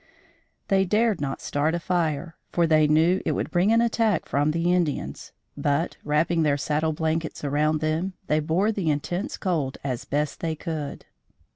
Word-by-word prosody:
They 195 -1 +4
dared 210 -1 +1
not 135 -2 -3
start 150 +3 0
a - - -1
fire; 165 -2 -1 0.2
for 170 - +2
they 155 -1 +4
knew 165 +5 +3
it - - 0
would - - -3
bring 180 +4 +3
an 230 +1 +5
attack 225 -5 +1
from 145 +2 +1
the 170 +3 +1
Indians, 145 - -2 0.2
but 145 +4 0
wrapping 160 +3 +1
their 145 -2 +2
saddle 155 +3 0
blankets 160 0 -2
around 150 +2 +1
them, 160 +5 -1
they 155 -2 +2
bore 170 +8 +1
the 195 -7 -1
intense 175 +6 -2
cold 155 -8 -1
as 130 -3 -3
best 145 +1 -1
they 160 -1 -2
could. 155 -3 -5
160 Hz, 170 wpm, -25 LUFS, 150-175 Hz, 0.2 s, an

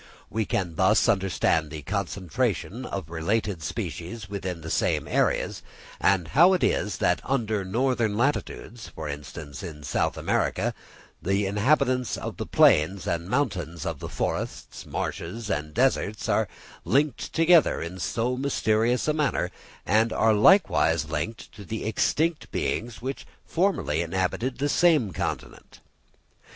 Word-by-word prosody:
We 110 -1 0
can 90 -4 -2
thus 105 +6 +4
understand 95 -7 +1
the 75 -1 -7
concentration 95 -1 -2
of 80 - -5
related 95 +2 -1
species 90 +6 -5
within 95 -4 -4
the 80 +1 -6
same - - +1
areas; - - 0 0.4
and 90 -5 +2
how 175 +6 +6
it 185 - +1
is 105 - +1
that 90 - +1
under 110 -6 0
different 115 +1 0
latitudes, 120 -3 -2
for 80 -1 -7
instance, 75 0 -7
in 80 -5 -8
South 70 - 0
America, - - 0 0.5
the 100 +2 +1
inhabitants 125 +5 +1
of - - -6
the - - -4
plains 85 +5 +4
and 85 +1 -2
mountains, 90 - -1
of 80 -5 -3
the - - -6
forests, - - -4
marshes, 105 +6 -4
and 75 -1 -3
deserts, 115 -4 +1
are - - +2 0.4
linked 140 -2 +1
together 165 -1 +4
in 85 +3 -6
so 120 +7 -1
mysterious 120 -2 +1
a 150 - +3
manner, 150 -2 0 0.3
and 110 +2 +3
are 110 0 +3
likewise 85 - +4
linked 80 +9 -4
to 105 - -11
the 110 +4 -5
extinct 155 +8 0
beings 115 +1 -2
which 135 +1 -5 0.2
formerly 170 - 0
inhabited 95 +9 -1
the 140 +2 0
same 145 - +3
continent. - - -5
105 Hz, 140 wpm, -26 LUFS, 85-125 Hz, 0.5 s, how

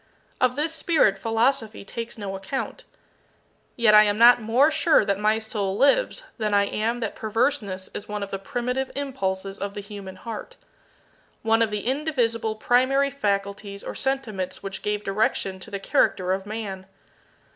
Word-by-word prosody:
Of 250 0 +2
this 310 +3 0
spirit 310 - +2
philosophy 225 0 0
takes 230 +3 -6
no 200 -2 -5
account. 265 - -5 0.9
Yet 230 -3 +4
I 210 - +10
am 205 -1 +2
not 240 +1 +7
more 245 +8 +4
sure 310 -6 +4
that 200 -1 0
my 215 +1 +3
soul 205 -3 -2
lives - - +3 0.2
than 210 -2 +1
I 200 - +5
am 225 +4 -1
that 225 - -2
perverseness 215 -4 -1
is 205 - -6
one 210 -1 -3
of 200 - -7
the 195 - -3
primitive 250 +6 -2
impulses 195 -9 -3
of 200 0 -4
the - - -4
human 200 -2 -8
heart 220 +3 -7 0.9
one 225 0 +3
of 225 - +3
the 210 -1 -4
indivisible 240 -5 0
primary 260 +5 +2
faculties 200 -4 -2
or - - -5
sentiments 235 -11 -3
which 195 -1 -5
gave 210 0 -2
direction 195 -1 0
to - - -10
the 200 - -3
character 185 -1 +2
of 190 +1 -4
Man. 200 -3 -5
215 Hz, 165 wpm, -25 LUFS, 200-250 Hz, 0.9 s, I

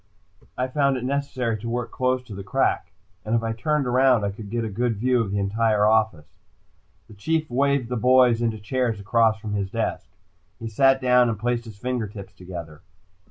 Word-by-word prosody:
I 130 - 0
found 140 0 +1
it 125 - -5
necessary 130 -4 -2
to 115 +3 -5
work 120 -1 -3
close 130 0 0
to 115 - -11
the 100 0 -7
crack, 125 -7 0 0.3
and 110 +2 -1
if 115 - 0
I 115 0 -1
turned 150 +5 0
around, 125 -2 +3
I 100 - -1
could 100 0 -9
get 115 +1 -2
a - - -2
good 115 +3 -1
view 125 +3 +1
of 110 - -3
the 100 - -2
entire 105 +1 +1
office. 110 -9 +1 0.7
The 110 - -14
Chief 155 +10 -1
waved 140 0 +1
the 125 - -2
boys 125 -1 +4
into 115 -2 0
chairs 115 +1 -2
across 110 +2 +2
from 105 -1 -5
his 100 -2 -2
desk. - - -3 0.5
He 115 - -6
sat 135 +4 +3
down 125 -1 +4
and 110 - -2
placed 120 +2 -1
his 110 -3 -11
fingertips 105 -5 -5
together. 85 -5 -9
115 Hz, 200 wpm, -24 LUFS, 105-125 Hz, 0.7 s, boys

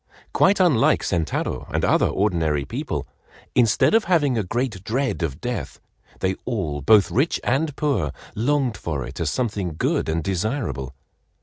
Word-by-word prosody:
Quite 200 +1 +4
unlike 165 -11 +4
Sentaro 85 -4 -2
and - - 0
other - - +3
ordinary 80 -8 0
people, - - -4 0.5
instead 120 - +3
of 225 0 +4
having 155 -7 +2
a 110 - +1
great 110 -1 -2
dread 130 +1 -1
of 75 -5 -2
death, - - -4 0.4
they 95 0 +1
all, 85 - -2
both 100 +7 +5
rich 140 +7 +1
and 145 +3 0
poor, 140 - 0 0.2
longed 130 0 0
for 75 -6 -3
it 65 +6 -9
as 80 -3 0
something 100 -7 -2
good - - 0
and 80 0 -1
desirable. 95 - -2
105 Hz, 150 wpm, -23 LUFS, 80-135 Hz, 0.5 s, both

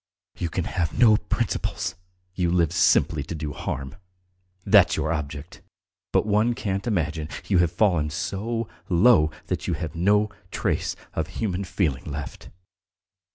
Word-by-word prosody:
"You 85 - -3
can 90 - -2
have 85 -3 -2
no 115 -3 +7
principles; - - -2 0.4
you 90 -2 0
live 85 -3 +2
simply 80 -3 +3
to 75 +4 -5
do 75 -2 -4
harm 65 0 -5 0.7
that's - - +5
your 80 - 0
object; 75 0 -6 0.5
but - - +2
one 110 +3 +2
can't 95 -1 -3
imagine 80 -7 -1 0.2
you 95 -4 +3
have 85 -2 +3
fallen 85 -5 +2
so 105 +8 -3 0.2
low 90 -3 +5 0.2
that - - -3
you - - 0
have 80 -4 -5
no 105 +4 +3 0.2
trace - - -1 0.2
of - - -2
human 100 -3 -1
feeling 85 -8 -1
left! 75 -1 -7
85 Hz, 145 wpm, -25 LUFS, 75-105 Hz, 0.7 s, no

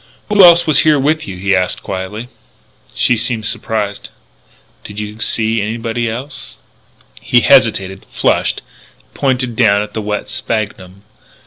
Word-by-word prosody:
"Who 205 -2 +5
else 170 -1 +7
was 155 -2 +4
here 155 -1 +4
with 155 +3 0
you?" 95 - -7
he 100 +1 +1
asked 90 -1 -1
quietly. 100 +5 -6 0.7
She 125 - +2
seemed 115 -1 0
surprised. 105 -2 -3 0.7
"Did 105 0 -8
you 105 +1 -7
see 110 -1 +1
anybody 115 +2 -3
else?" 130 +6 -6 0.6
He - - +3
hesitated, 95 0 +2
flushed, - - 0 0.5
pointed 130 -3 -1
down 105 -3 +3
at 105 0 -10
the 110 - -3
wet 105 0 -4
sphagnum. 100 -3 -4
110 Hz, 135 wpm, -15 LUFS, 105-125 Hz, 0.7 s, else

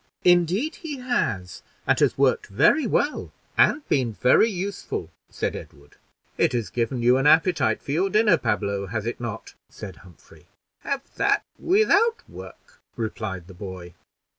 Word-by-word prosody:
"Indeed 180 - +2
he 300 -4 -6
has, 115 - -2 0.2
and - - +2
has - - +2
worked - - +2
very 250 - +3
well, 290 +6 -1 0.2
and 290 0 +3
been 125 -5 0
very 130 - +4
useful," 185 - -5 0.2
said - - -3
Edward. 70 +1 -12 0.4
"It - - +3
has 120 -3 -2
given 120 +1 -2
you 125 +2 +5
an 135 +2 +2
appetite 165 +3 +3
for - - -5
your 180 +6 +1
dinner, 210 -5 +3
Pablo, 100 -5 -1
has 110 +2 -4
it 120 +1 -4
not?" 115 -2 -6 0.2
said 95 -5 -10
Humphrey. 90 -3 -19 0.3
"Have 275 -1 -3
that - - +2 0.2
without 435 +4 +2
work," - - -13 0.2
replied 110 -5 -4
the 95 - -13
boy. 90 -2 -9
130 Hz, 150 wpm, -24 LUFS, -, 0.4 s, you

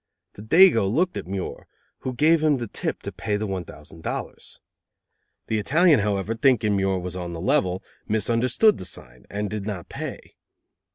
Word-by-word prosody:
The - - -11
dago 115 - +5
looked 180 +9 +1
at - - -5
Muir, 95 0 -5 0.3
who 130 -1 -4
gave 155 +4 +4
him 150 -3 +3
the 120 - -3
tip 105 - -4
to - - -4
pay 105 - -2
the 110 - -3
one 95 -3 -3
thousand 80 +2 -13
dollars. - - -6 0.9
The 110 - -1
Italian, 155 - +4
however, 100 +1 -1
thinking 115 -3 +2
Muir 95 -1 +1
was 90 0 -5
on 90 -1 -5
the 85 - -6
level, 95 - +1 0.2
misunderstood 120 - +2
the - - -6
sign, 65 -8 -9
and 105 +1 -3
did 105 -1 -5
not 95 -5 -5
pay. - - -7
105 Hz, 175 wpm, -24 LUFS, 95-130 Hz, 0.9 s, dago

